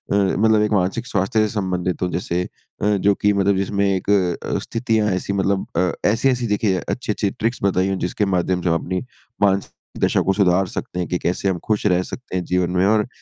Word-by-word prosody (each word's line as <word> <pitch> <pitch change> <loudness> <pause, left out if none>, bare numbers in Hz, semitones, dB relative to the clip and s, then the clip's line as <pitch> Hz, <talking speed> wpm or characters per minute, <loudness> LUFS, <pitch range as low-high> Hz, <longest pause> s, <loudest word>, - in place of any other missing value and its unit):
मतलब 105 +2 +3
एक 105 - +1
मानसिक 100 +5 0
स्वास्थ्य 100 +1 0
से 110 - +3
संबंधित 90 -3 -2
हो 90 - +1
जैसे 90 0 -2
अ, 95 - -9
जो 100 +1 +3
कि 105 - +4
मतलब 100 0 +2
जिसमें 100 +1 0
एक 95 0 -1
अ, 90 -4 +1
स्थितियाँ 110 -2 0
ऐसी 95 +2 -2
मतलब 100 0 0
अ, 90 0 +2 0.2
ऐसी-ऐसी 125 +1 +1
देखिए 105 -3 +1
अच्छी-अच्छी 105 -4 -1
ट्रिक्स 115 +2 -2
बताई 95 -1 +2
हों 95 - -1
जिसके 95 +3 -1
माध्यम 90 -1 0
से 90 - 0
हम 85 - +2
अपनी 95 0 -2 0.4
मानसिक 100 -1 +2 0.3
दशा - - +3
को 95 - +1
सुधार 95 -1 +3
सकते 90 - -5
हैं 90 - -1
कि 90 - 0
कैसे 95 +2 -1
हम 90 -2 -1
खुश 105 -1 0
रह 90 -1 +3
सकते 120 -1 -8
हैं 90 - -2
जीवन 90 -1 0
में 90 +1 +2
और 105 +2 +3
95 Hz, 210 wpm, -21 LUFS, 90-105 Hz, 0.4 s, कि